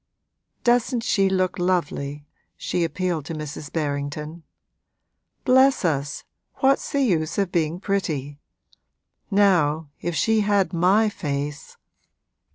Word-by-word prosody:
'Doesn't 240 0 +2
she 195 -4 +2
look 185 -1 0
lovely?' 150 -5 -1 0.3
She 175 - -1
appealed 170 -1 -1
to 165 - -5
Mrs. 150 -1 -7
Berrington. 150 +1 -3 1.0
'Bless 260 -3 +4
us, 145 -3 -1 0.3
what's 270 +1 +2
the 280 -1 +2
use 165 -8 0
of 195 -3 0
being 165 0 0
pretty? 150 -8 -2 0.9
Now, 170 -7 +3
if 175 -1 -2
she 220 +9 +2
had 200 -4 +1
my 190 +6 +4
face!' 145 -6 -4
175 Hz, 110 wpm, -23 LUFS, 150-200 Hz, 1.0 s, Bless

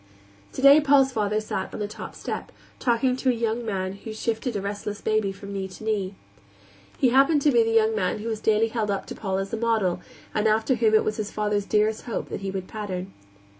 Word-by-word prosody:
Today 280 +3 +6
Paul's 275 -2 +4
father 215 -3 0
sat 200 -3 -4
on - - -6
the 210 - -2
top 210 - -8
step, - - -5 0.3
talking 250 +1 +2
to 260 - +1
a - - +4
young 230 0 -1
man 190 -4 -2
who 220 +2 -8
shifted 230 +2 -2
a - - 0
restless 205 +1 -4
baby 215 -2 0
from 200 +1 -9
knee 195 -1 -3
to 185 +3 -12
knee. 205 -3 -1 0.8
He 255 - +4
happened 275 +4 +4
to 295 - +5
be 240 -3 +5
the 225 - +1
young 225 -1 +3
man 185 -4 0
who 215 +2 -6
was 220 -2 -2
daily 220 +1 +2
held 220 -2 -2
up 200 -1 -1
to - - -7
Paul 190 -2 -2
as 195 0 -4
a - - 0
model, 220 -6 +1 0.3
and 215 +1 +1
after 220 +4 +2
whom 225 -3 +3
it 215 - +5
was 215 - -2
his 215 -2 -3
father's 210 -1 -1
dearest 215 +1 +1
hope 235 - -4
that - - -5
he 195 - -3
would 190 -1 -4
pattern. 195 -3 -5
215 Hz, 230 wpm, -25 LUFS, 200-230 Hz, 0.8 s, Today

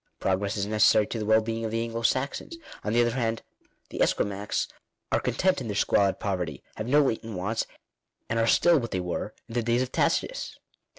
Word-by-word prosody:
Progress 100 +3 0
is 100 - 0
necessary 105 0 +4
to 115 - -4
the 105 - -3
well 110 +1 +5
being 115 +1 -3
of 110 - -1
the 115 +1 -1
Anglo 115 0 -4
Saxons; 140 - -1 0.3
on 105 - -1
the 120 +2 +4
other 120 0 +2
hand 115 -2 -1 0.5
the - - -4
Esquimaux 100 0 0 0.6
are - - +3
content 185 -5 +1
in 120 - -5
their 105 - -3
squalid 100 -1 +2
poverty, 90 -8 -3
have 110 - -5
no 145 +3 +5
latent 110 -5 -2
wants, 105 +5 -1 0.6
and 115 - 0
are 115 - +2
still 170 +6 +5
what 120 -2 -4
they 95 - -2
were 90 +4 -4
in 115 - -10
the 120 - +1
days 120 +2 +2
of 130 - -6
Tacitus. - - 0
115 Hz, 210 wpm, -27 LUFS, 105-120 Hz, 0.6 s, well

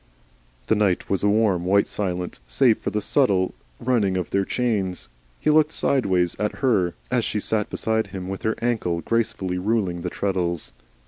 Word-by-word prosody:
The - - +2
night 105 -4 +1
was 95 - +1
a 105 - +3
warm 105 -4 +2
white 100 +2 +3
silence 90 -8 -3
save 110 - +3
for - - -2
the 105 - -2
subtile 100 -10 +2 0.3
running 110 -7 +1
of 90 - -3
their 100 0 +1
chains. 100 - -1 0.3
He - - +2
looked 155 0 +4
sideways 95 -10 +1
at 105 0 0
her 95 -9 +2 0.2
as 125 -2 +2
she 105 - -1
sat 105 0 0
beside 110 -1 0
him 95 -2 -6
with 95 0 -5
her 110 0 0
ankles 95 -8 0
gracefully 95 -5 0
ruling 95 -4 0
the 90 - -3
treadles. 90 -3 -2
100 Hz, 175 wpm, -23 LUFS, 90-110 Hz, 0.3 s, looked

